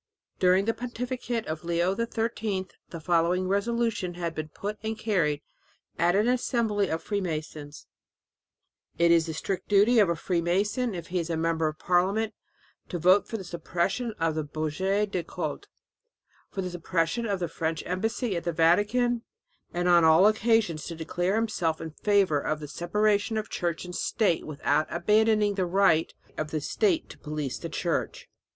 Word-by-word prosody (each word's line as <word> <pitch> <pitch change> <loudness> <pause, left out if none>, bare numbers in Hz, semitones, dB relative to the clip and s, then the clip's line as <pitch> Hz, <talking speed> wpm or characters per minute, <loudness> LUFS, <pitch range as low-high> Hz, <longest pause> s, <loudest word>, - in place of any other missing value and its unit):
During 185 +1 +4
the 225 - +1
pontificate 245 -1 -4
of 155 +1 -5
Leo 170 +2 +1
XIII 225 -4 -2 0.2
the 165 - -7
following 175 +3 +1
resolution 200 -2 0
had 170 -2 -3
been 155 -1 -4
put 205 +7 -5
and 220 0 -3
carried 165 -10 0 0.6
at 175 +2 +3
an 210 +3 +3
assembly 235 -5 +1
of 160 - -2
freemasons: 155 -6 -4 1.1
"It 170 0 +4
is 165 -1 +4
the 160 - -4
strict 185 +3 -4
duty 210 +4 +5
of 200 -4 +5
a 170 - +1
freemason, 190 +8 0
if 170 -1 -7
he 180 +1 0
is 170 0 -3
a 165 - -1
member 165 0 +1
of 155 0 -4
parliament, 195 +6 +1 0.6
to 180 - -3
vote 185 +4 +4
for 225 - -4
the 195 - -7
suppression 175 +7 -2
of 165 -1 +1
the 155 0 -2
Budget 190 +8 -1
des 180 - -1
Cultes, 160 -3 -5 0.8
for 195 - -4
the 180 - -4
suppression 175 +5 -1
of 200 -2 -1
the 175 - -1
French 160 0 -3
embassy 220 +4 -1
at 170 - -3
the 170 - -1
Vatican, 205 +9 +2 0.5
and 175 +1 -1
on 175 -1 +6
all 160 +4 +6
occasions 215 -6 +2
to 170 - -5
declare 175 +4 -1
himself 195 -8 0
in 160 - -6
favour 195 -3 +2
of 155 +2 -2
the 150 - -7
separation 205 - 0
of 215 0 -4
church 170 0 -2
and 180 0 -7
state 195 -5 0
without 150 0 0
abandoning 210 +3 +3
the 190 -2 -1
right 175 -3 +3 0.2
of 155 - -2
the 155 - -2
state 340 - 0
to - - -14
police 150 -4 -4
the 165 - -5
church." 165 +1 -2
180 Hz, 170 wpm, -27 LUFS, 165-210 Hz, 1.1 s, on